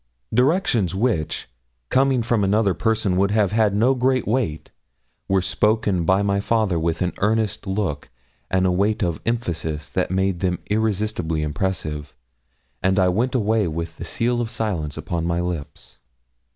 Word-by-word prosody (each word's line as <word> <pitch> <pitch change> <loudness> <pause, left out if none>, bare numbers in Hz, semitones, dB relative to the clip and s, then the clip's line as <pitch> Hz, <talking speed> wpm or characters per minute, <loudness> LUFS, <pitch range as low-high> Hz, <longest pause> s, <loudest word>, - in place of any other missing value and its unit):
Directions 125 - +2
which, 100 -7 -1 0.4
coming 130 -2 +3
from 115 -2 +1
another 100 0 +2
person 110 -4 0
would 100 +1 +3
have 105 -2 +2
had 105 -2 +2
no 120 +6 +4
great 130 0 +1
weight, 100 -11 -1 0.6
were 95 -1 +2
spoken 105 -4 +1
by 95 +4 +3
my 100 0 +1
father 105 -4 +1
with 80 +2 0
an 90 - -1
earnest 110 -1 0
look 95 -7 -2 0.4
and 95 0 +2
a 90 - +3
weight 100 +4 +1
of 85 -3 -1
emphasis 80 -10 -2
that 90 - 0
made 95 -1 0
them 90 -1 0
irresistibly 105 -7 0
impressive, 75 -2 -3 0.7
and 95 +1 +2
I 95 -2 +4
went 120 +8 0
away 110 -3 +2
with 85 +1 -4
the - - -6
seal 120 +1 0
of 115 - -3
silence 90 -11 -2
upon 85 -2 -3
my 85 0 0
lips. 85 -5 -5
100 Hz, 155 wpm, -22 LUFS, 85-110 Hz, 0.7 s, no